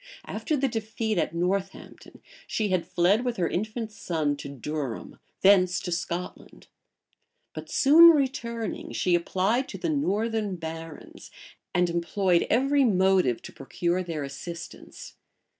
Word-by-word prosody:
After 310 - -2
the 270 0 +1
defeat 220 -3 -2
at 165 - -2
Northampton, 190 +3 -4 0.2
she 215 -2 -1
had 185 -2 0
fled 190 +7 +2
with 245 -2 -2
her 175 - +1
infant 215 +5 -3
son 155 -8 -2
to 140 - -8
Durham, 140 -2 -5 0.2
thence 185 -2 +5
to 180 - -5
Scotland; 175 +1 -5 0.9
but - - -8
soon 320 +5 +8
returning, 245 - -1
she 180 - +1
applied 190 +9 +1
to - - -6
the 340 - -3
northern 220 -7 -1
barons, 165 -1 -9 0.4
and 180 0 +2
employed 175 +1 +1
every 275 +4 +3
motive 190 - +2
to - - -10
procure 170 +6 -2
their 165 -5 -4
assistance. 170 +5 -9
190 Hz, 130 wpm, -26 LUFS, 170-225 Hz, 0.9 s, soon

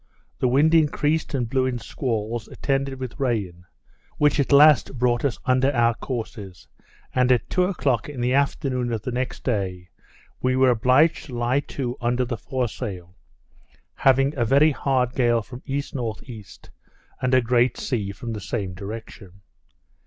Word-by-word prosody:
The - - +2
wind 145 +6 +3
increased 155 -1 +2
and 125 -3 -1
blew 130 +2 +1
in 125 -1 -2
squalls, 115 -2 -3
attended 135 -1 -2
with 130 +1 -7
rain, 100 -10 -2 0.5
which 150 0 +3
at 140 - 0
last 145 -2 +6
brought 120 0 +1
us 140 -5 0
under 130 +2 +3
our 120 -2 +3
courses; 110 -7 -7 0.5
and 125 0 +3
at 125 - +2
two 180 0 +2
o'clock 140 - -1
in 140 -4 -7
the 125 +1 +1
afternoon 135 -3 0
of 110 -2 -3
the 125 - -3
next 125 +1 -3
day, 95 -6 -2 0.5
we 130 0 +1
were 130 -1 +4
obliged 130 +7 +3
to 125 -4 -7
lie 120 +3 +1
to 130 -3 -5
under 120 +1 +1
the 120 - -3
foresail, 105 -7 -5 0.8
having 135 +2 +3
a 120 - +1
very 140 +6 +4
hard 130 -3 0
gale 120 -3 +2
from 125 +3 -10
E.N.E., 120 -5 -5 0.8
and 130 0 0
a - - +6
great 120 0 +2
sea 105 -7 -2
from 115 +4 -6
the 105 - -6
same 95 -3 -4
direction. 100 -1 -9
125 Hz, 160 wpm, -23 LUFS, 115-135 Hz, 0.8 s, last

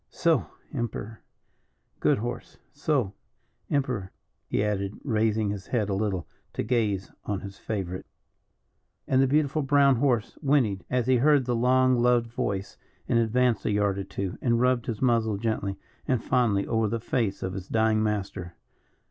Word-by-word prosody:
Soh! 165 -2 +1 0.3
Emperor, 115 -4 -4 0.8
good - - +3
horse. 120 +3 -5 0.2
Soh! 140 -8 0 0.6
Emperor!" 125 -9 -1 0.4
he - - 0
added, 100 -1 -2
raising 110 -3 +1
his 100 -1 -6
head 110 -5 0
a - - 0
little 95 -3 -1 0.3
to - - -2
gaze 105 -6 0
on 100 -2 -2
his 100 0 -9
favourite. 95 -4 -4 1.0
And 130 0 +3
the 135 - +4
beautiful 150 +2 +2
brown 140 -1 +4
horse 120 -4 0
whinnied 130 - +2
as 125 -2 +1
he 130 0 +4
heard 140 +1 +4
the 120 -1 0
long 130 +2 +4
loved 120 -1 +3
voice, 100 -4 -3 0.3
and 115 - +3
advanced 115 0 +2
a - - +2
yard 100 -1 +1
or - - -2
two, 95 -1 -5
and 120 -2 +2
rubbed 125 -1 +2
his 115 +1 -3
muzzle 115 -4 +2
gently 105 -3 -2 0.3
and 130 -3 +1
fondly 115 -6 +2
over 110 -1 +1
the 115 +2 -1
face 110 -3 -1
of 95 - -3
his 95 -1 -6
dying 110 -1 +2
master. 95 -5 -2
115 Hz, 160 wpm, -27 LUFS, 100-125 Hz, 1.0 s, the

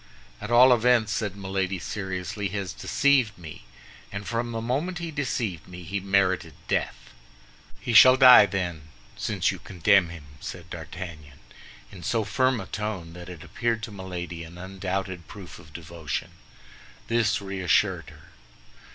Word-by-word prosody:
"At 105 - -6
all 125 +2 +7
events," 120 -2 +3
said 105 -4 -2
Milady, 95 -1 -2
seriously, 95 +2 -4
"he 100 +2 -5
has 95 -3 -4
deceived 135 -7 +2
me, 80 -8 -11 0.5
and 100 0 -6
from 120 0 -2
the 115 - -3
moment 140 +10 -2
he 170 -1 -5
deceived 115 - -3
me, 90 0 -10
he 95 +4 -3
merited 95 -1 +1
death." - - -2 0.7
"He 120 - -3
shall 130 +4 +9
die, 125 -5 +9
then, 85 -6 -3 0.3
since - - 0
you - - -7
condemn 95 0 +3
him!" 85 -4 -10
said - - -8
D'Artagnan, 80 -6 -8 0.5
in 95 -3 -11
so 115 +4 0
firm 130 +5 +1
a 95 - -6
tone 100 -6 -5
that 90 0 -10
it 85 -3 -9
appeared 115 -1 -2
to 110 - -5
Milady 90 -3 -6
an 85 +1 -11
undoubted 95 -1 -4
proof 95 -4 -11
of 75 - -16
devotion. 80 -3 -5 0.8
This 110 -2 +2
reassured 95 -3 0
her. - - -17
95 Hz, 150 wpm, -26 LUFS, 90-115 Hz, 0.8 s, shall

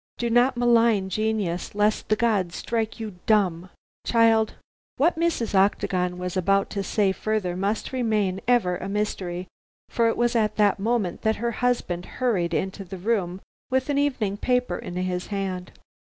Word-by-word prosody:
"Do 235 -1 -1
not 245 +2 +3
malign 230 -5 +3
genius, 205 -4 -2
lest 210 +1 +1
the 215 - +4
gods 205 -6 0
strike 225 -1 -2
you 215 -5 -6
dumb. 185 -5 +2 0.3
Child 225 -1 +3 0.2
" - - -86
What 330 +6 +3
Mrs. 320 -10 0
Octagon 185 -2 +1
was 180 0 -4
about 195 +2 +1
to 200 - -2
say 195 0 +1
further 200 -3 -2
must 200 +4 -2
remain 210 -6 0
ever 220 -8 +3
a 190 - -6
mystery, 185 -3 -3 0.4
for 230 -1 +2
it 225 - 0
was 240 0 +1
at 215 -2 +1
this 205 -2 +3
moment 215 -3 -1
that 220 0 +1
her 235 +2 -2
husband 230 -8 -1
hurried 185 -10 0
into 190 +1 -2
the 190 +1 -8
room 190 -2 -1 0.3
with 260 +2 0
an 280 - +1
evening 240 -9 0
paper 250 -5 0
in 175 - -7
his 180 0 -2
hand. 190 -3 -4
210 Hz, 165 wpm, -25 LUFS, 185-230 Hz, 0.4 s, the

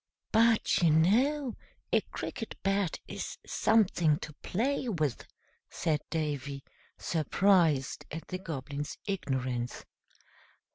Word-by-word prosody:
"But, 225 -2 +4
you 170 - +5
know, 240 - +3 0.4
a - - +5
Cricket 225 - -6
Bat 195 -3 +1
is - - -5
something 180 -8 +3
to 150 - -7
play 255 +5 0
with!" 155 - -1 0.4
said 150 -2 0
Davy, 145 -4 -2 0.3
surprised 165 -3 +2
at 160 +1 -7
the 185 - -4
Goblin's 145 -4 -5
ignorance. 130 - -2
165 Hz, 100 wpm, -30 LUFS, 145-205 Hz, 0.4 s, you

